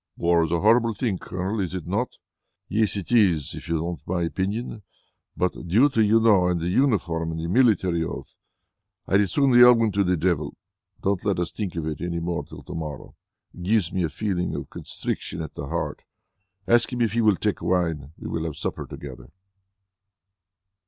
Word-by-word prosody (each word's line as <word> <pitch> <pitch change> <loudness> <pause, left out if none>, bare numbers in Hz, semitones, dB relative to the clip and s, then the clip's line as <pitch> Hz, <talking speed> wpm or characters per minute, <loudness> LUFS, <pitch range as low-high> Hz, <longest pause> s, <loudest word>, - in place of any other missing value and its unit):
"War 85 -1 +3
is 80 - -2
a 85 - +2
horrible 115 +1 +4
thing, 105 -7 -1
Colonel. 95 +4 -3
Is 95 -2 -2
it 90 - -5
not?" 105 +8 -2 0.5
"Yes, 105 -1 +1
it 100 - -5
is, 90 - +3
if - - -9
you 80 -1 0
want 85 -4 -4
my 85 -1 0
opinion. 100 +6 -3 0.6
But 90 0 -2
duty, 110 - +4
you 110 +2 +5
know, 105 -5 +4
and 90 -1 +1
the 85 +2 -2
uniform 90 -9 +1
and 80 0 -4
the 80 - -3
military 95 -5 +3
oath. - - -6 0.7
I'd 95 +1 +4
as 100 -3 0
soon 140 -2 +3
they 120 0 +7
all 125 0 +9
went 115 -3 +1
to 100 - +2
the 90 -1 +1
devil. 75 -4 0 0.5
Don't 100 -1 0
let 100 -3 0
us 90 -1 -2
think 100 -5 -4
of 85 -2 -3
it 80 -1 -4
any 85 -1 -2
more 85 0 -2
till - - -12
to - - -9
morrow. 75 -5 -6 0.4
It - - -11
gives 95 -1 +1
me 95 - 0
a 85 - 0
feeling 90 +2 -2
of - - -6
constriction 85 - -5
at 80 -2 -6
the 70 - -6
heart. 85 +4 -3 0.7
Ask 120 +2 +4
him 125 -1 -2
if 115 -3 +1
he 120 - +2
will 105 -3 +4
take 105 +2 -1
wine. 80 -6 0
We - - -8
will 80 0 -3
have 80 -3 -4
supper - - -4
together." - - -9
90 Hz, 200 wpm, -24 LUFS, 85-110 Hz, 0.7 s, all